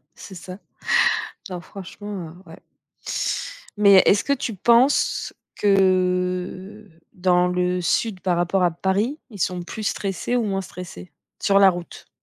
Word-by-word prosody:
C'est 190 - -11
ça. 185 +2 -9 0.9
Non, 180 -1 -5
franchement, 195 -1 -8
heu, - - -14
ouais 165 - -12 1.2
mais 200 -2 +7
est-ce 205 - +4
que 280 - +1
tu 245 -5 -2
penses 240 +7 +2 0.2
que, - - -3 1.2
heu, 165 0 -25
dans 180 -1 +2
le 180 0 0
sud 190 +2 0
par 180 -2 0
rapport 175 +2 +1
à 175 - +3
Paris, 195 - -1
ils 205 -4 -11
sont 180 +1 -1
plus 215 +5 -7
stressés 200 +5 -2
ou 240 - +1
moins 195 -2 -1
stressés 175 - -10 0.3
sur 195 -1 +3
la 195 -1 +7
route? 175 -1 -9
190 Hz, 145 wpm, -22 LUFS, 180-205 Hz, 1.2 s, mais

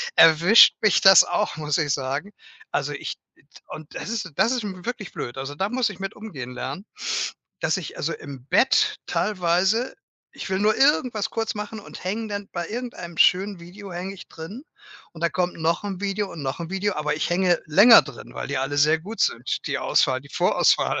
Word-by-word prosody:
erwischt 170 +7 +7
mich 215 -4 +3
das 190 -3 +9
auch, - - -1
muss 150 -2 -1
ich 150 -3 0
sagen. 140 +9 -3 0.4
Also, - - -1
ich - - -6 0.5
und 155 -1 -10
das - - -6
ist 220 -6 -4
das 230 - +2
ist 250 -3 -1
n 185 -3 -7
wirklich 240 -5 -5
blöd. 120 - -6
Also, 135 +2 -6
da 190 +6 -1
muss 250 -1 0
ich 200 -3 -10
mit 195 0 -5
umgehen 145 - -8
lernen, 140 +10 -6 0.8
dass - - +1
ich 185 -6 -7
also 165 - -2
im 135 -4 -10
Bett 265 - +3
teilweise 190 +4 0 0.4
ich - - -8
will 190 - 0
nur 210 +2 +2
irgendwas 250 -7 +2
kurz 225 0 -2
machen 210 +1 -6
und 200 - -12
hänge 215 +4 -3
dann 205 -1 -5
bei 175 -1 -4
irgendeinem 230 -8 -6
schönen 195 +1 +3
Video 190 +4 -11
hänge 180 +3 -5
ich 195 - -13
drin 180 +11 -9 0.5
und 165 - -11
dann 170 - +1
kommt 180 -1 -1
noch 165 +1 0
'n 195 -3 -4
Video 200 0 -2
und 160 - -8
noch 135 +4 -4
'n 165 - -5
Video, 195 +2 -1
aber 150 0 -2
ich 155 - -2
hänge 175 -1 +2
länger 205 +9 +8
drin, 140 -3 -12
weil - - -5
die 140 -1 -2
alle 135 +2 -2
sehr 155 +3 +4
gut 210 +7 -9
sind, 120 +2 -1
die - - -1
Auswahl, 130 0 +1
die 140 - -16
Vorauswahl. - - +2
185 Hz, 205 wpm, -23 LUFS, 155-210 Hz, 0.8 s, das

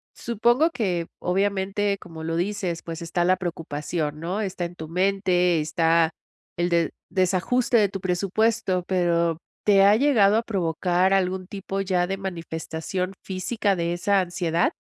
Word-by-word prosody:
Supongo 240 +7 +2
que 180 - -1
obviamente, 200 +2 0
como 160 -2 -10
lo 165 0 -2
dices, 185 -2 -2
pues 165 0 -6
está 175 +1 -1
la 185 +1 +4
preocupación 155 -3 -3
¿no? 180 +5 -2
Está 185 -3 -3
en 175 +1 -7
tu 160 -2 -7
mente, 180 -1 +2
está 165 +1 +2 0.5
el 175 +1 +1
de 170 -2 +1 0.2
desajuste 195 +7 +1
de 205 -3 +4
tu 195 - -5
presupuesto, 190 0 0
pero, 170 -3 +1 0.3
¿te 200 -2 +6
ha 205 +1 +6
llegado 220 -6 +4
a - - +2
provocar 180 -1 +1
algún 185 -1 0
tipo 195 -1 -4
ya 180 -2 +1
de 195 0 -2
manifestación 180 0 -4
física 195 +2 -1
de 170 0 -1
esa 195 +3 +2
ansiedad? 175 -2 0
185 Hz, 150 wpm, -24 LUFS, 170-200 Hz, 0.5 s, te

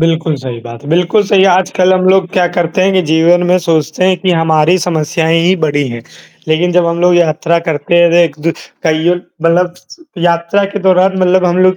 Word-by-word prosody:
बिल्कुल 160 -1 0
सही 130 -3 -7
बात 115 0 -11
है। 145 - -11
बिल्कुल 180 +5 +1
सही 195 -1 +3
आजकल 185 0 +1
हम 185 0 0
लोग 190 -1 +2
क्या 180 -2 +1
करते 175 +1 -1
हैं 195 +1 +1
कि 190 - +2
जीवन 170 +2 +3
में 180 +1 +2
सोचते 160 +1 -1
हैं 185 0 +2
कि 185 +1 -1
हमारी 165 0 +2
समस्याएँ 165 0 -1
ही 180 +2 +2
बड़ी 145 -1 -1
हैं। 120 -1 -7 0.5
लेकिन 170 +3 0
जब 175 -1 +2
हम 170 0 -2
लोग 180 0 +3
यात्रा 170 0 +1
करते 150 +1 -2
हैं 170 -1 +4
तो 170 - +2
एक 170 -4 +2
दू - - +3 0.3
कइयों 160 +1 +1 0.3
मतलब 175 +1 +1 0.5
यात्रा 170 +4 0
के 205 - -3
दौरान 185 +1 +3
मतलब 185 0 +2
हम 175 0 0
लोग 185 0 +3
170 Hz, 210 wpm, -12 LUFS, 160-180 Hz, 0.5 s, हैं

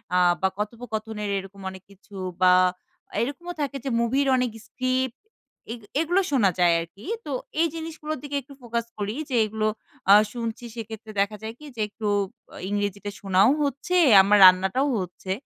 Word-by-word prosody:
আ - - +5 0.2
বা 190 - +4
কথোপকথনের 220 -1 -4
এরকম 195 +1 -8
অনেক 190 0 -11
কিছু 200 +1 -17 0.3
বা 180 0 +7 0.7
এরকমও 290 +8 -4
থাকে 280 -1 -2
যে - - 0
মুভির 265 +4 +1
অনেক 250 -2 0 0.2
স্ক্রিপ্ট 255 0 -1 0.5
এগ 235 - -10 0.2
এগুলো 350 +4 +2
শোনা 230 -8 +4
যায় 175 -1 +5
আর 165 - -6
কি। 200 - -15 0.2
তো 290 - -5 0.3
এই 335 - +4
জিনিসগুলোর 315 -1 -5
দিকে 290 -1 -5
একটু 275 +2 -15
ফোকাস 235 -1 -2
করি 205 +1 -3
যে 260 - -1
এগুলো 215 0 -1 0.4
আ - - +11 0.2
শুনছি 235 0 -4
সেক্ষেত্রে 220 -1 -7
দেখা 210 +1 -1
যায় 220 - -5
কি? 300 - -12
যে 220 - -3
একটু 210 +1 -5 0.6
ইংরেজিতে 205 0 -2
শোনাও 195 +2 +4
হচ্ছে 280 +6 -2 0.3
আমার 205 +2 +4
রান্নাটাও 190 +9 +5
হচ্ছে। 185 +1 -6
225 Hz, 165 wpm, -25 LUFS, 200-260 Hz, 0.7 s, আ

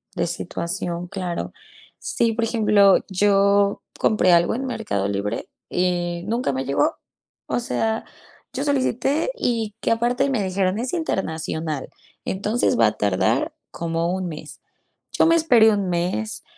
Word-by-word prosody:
De - - 0
situación, 175 0 -4
claro. 180 -2 -4 0.4
Sí, 230 -1 0
por 230 +1 -1
ejemplo, 210 -4 +4
yo 200 +1 +3 0.2
compré 210 -4 +3
algo 170 0 +4
en 265 +3 -3
Mercado 215 - -2
Libre 100 +1 -3 0.2
y 175 -1 -1
nunca 235 - 0
me 130 0 -2
llegó, 140 - +1 0.5
o - - 0
sea, 225 -2 -1 0.5
yo 265 +1 -2
solicité 285 - 0
y 225 - -1
que, - - +1
aparte 240 +4 +1
me 245 -7 0
dijeron, 190 0 0
es 245 +3 -3
internacional, 160 - -2 0.4
entonces 210 +5 0
va 115 - +6
a 105 0 -2
tardar 100 -3 +1 0.2
como 170 +1 -2
un 185 -1 -2
mes. 155 -3 -9 0.5
Yo - - +3
me 330 +1 +5
esperé 245 -9 +5
un 200 -3 0
mes, 180 +5 -2
200 Hz, 140 wpm, -22 LUFS, 170-230 Hz, 0.5 s, va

